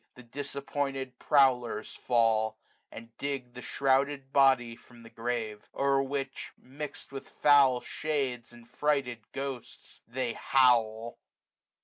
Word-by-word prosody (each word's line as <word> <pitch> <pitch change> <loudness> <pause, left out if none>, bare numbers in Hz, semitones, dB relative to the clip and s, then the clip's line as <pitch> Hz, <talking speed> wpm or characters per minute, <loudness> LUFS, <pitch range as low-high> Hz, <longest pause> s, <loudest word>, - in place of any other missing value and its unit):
410 125 - -13
The 140 +5 -6
disappointed 135 -2 -4
prowlers 125 -6 +2
fall, 110 -2 +1 0.3
and 115 +1 -11
dig 135 -4 -4
The 125 - -9
shrouded 135 +1 0
body 130 -4 +4
from 120 0 -18
the 115 - -14
grave; 115 -3 -4
o'er 140 0 +2
which, 135 0 -4
MixM 140 +3 -8
with 135 -1 -8
foul 140 -4 +5
shades, 135 -7 -3
and 120 -1 -16
frighted 140 -4 0
ghosts, 135 -3 -7
they 120 0 -2
howl. 115 -4 +2
130 Hz, 120 wpm, -29 LUFS, 120-140 Hz, 0.3 s, foul